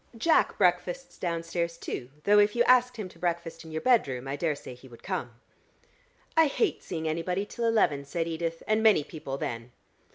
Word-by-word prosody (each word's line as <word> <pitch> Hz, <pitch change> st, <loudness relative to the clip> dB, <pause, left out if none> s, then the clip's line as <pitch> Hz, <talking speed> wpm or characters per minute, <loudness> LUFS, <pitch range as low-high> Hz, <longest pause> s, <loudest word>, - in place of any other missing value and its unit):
Jack 320 Hz, +8 st, +3 dB
breakfasts -, -, +1 dB
downstairs, 170 Hz, -1 st, -2 dB
too, 125 Hz, -6 st, -5 dB
though 205 Hz, +1 st, +5 dB
if 205 Hz, +1 st, +3 dB
you 240 Hz, -, +4 dB
asked 250 Hz, -1 st, +4 dB
him 210 Hz, -4 st, -4 dB
to 170 Hz, -, -18 dB
breakfast 170 Hz, -1 st, -3 dB
in 160 Hz, -, -11 dB
your 155 Hz, 0 st, -3 dB
bedroom, 135 Hz, -, +2 dB
I 135 Hz, -, -2 dB
daresay 145 Hz, -3 st, -3 dB
he 125 Hz, +2 st, -15 dB
would 120 Hz, -2 st, -15 dB
come." 115 Hz, -, -4 dB, 1.0 s
"I 325 Hz, -1 st, +6 dB
hate 395 Hz, +8 st, 0 dB
seeing 160 Hz, -3 st, -4 dB
anybody 180 Hz, +5 st, -1 dB
till 235 Hz, +3 st, -4 dB
eleven," 175 Hz, -11 st, +2 dB
said 165 Hz, +4 st, -3 dB
Edith, 165 Hz, 0 st, -3 dB
"and 215 Hz, +1 st, +2 dB
many 215 Hz, -9 st, +5 dB
people 140 Hz, -3 st, -6 dB
then." 115 Hz, -2 st, -5 dB
170 Hz, 185 wpm, -28 LUFS, 150-215 Hz, 1.0 s, I